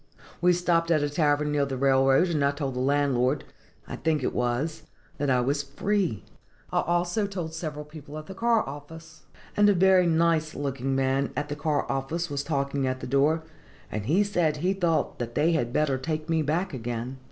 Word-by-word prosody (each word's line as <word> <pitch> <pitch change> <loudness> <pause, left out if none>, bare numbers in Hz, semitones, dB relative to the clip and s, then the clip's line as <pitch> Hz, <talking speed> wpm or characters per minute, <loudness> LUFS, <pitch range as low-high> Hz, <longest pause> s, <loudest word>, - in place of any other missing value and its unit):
"We 180 +1 +5
stopped 170 -1 +1
at 155 -3 +3
a 145 - -1
tavern 150 -1 +1
near 145 -1 +2
the 135 -1 -3
railroad, 135 +5 +4
and 155 -4 0
I 140 - +4
told 140 -2 -3
the 125 - -4
landlord 135 0 +1 0.4
(I - - -6
think 155 -3 0
it - - -1
was) 125 +7 -1 0.4
that 145 0 0
I 125 -1 +3
was 140 +4 0
free. 145 - -1 0.5
I - - +3
also 175 +5 0
told 175 -5 -5
several 155 -2 -5
persons 150 -1 -11
at 155 - -7
the 190 - -8
car 230 +2 +1
office; 160 +4 -10 0.3
and 205 0 +5
a 205 - +4
very 185 0 +5
nice 160 -1 +2
looking 135 -1 -2
man 135 0 +1
at 145 +2 -3
the 145 - -3
car 145 -1 0
office 150 +5 -2
was 140 0 -2
talking 140 -2 -1
at 130 0 -2
the - - -6
door, 145 +5 +2 0.5
and 105 -1 -4
he 180 +9 +4
said 175 -7 0
he 180 +6 +1
thought 175 -4 0
that 120 -1 -4
they 155 +3 +3
had 120 -8 0
better 140 -1 +1
take 155 +2 -3
me 165 -1 +1
back 165 +5 -1
again. 120 +1 -4
150 Hz, 200 wpm, -26 LUFS, 135-165 Hz, 0.5 s, We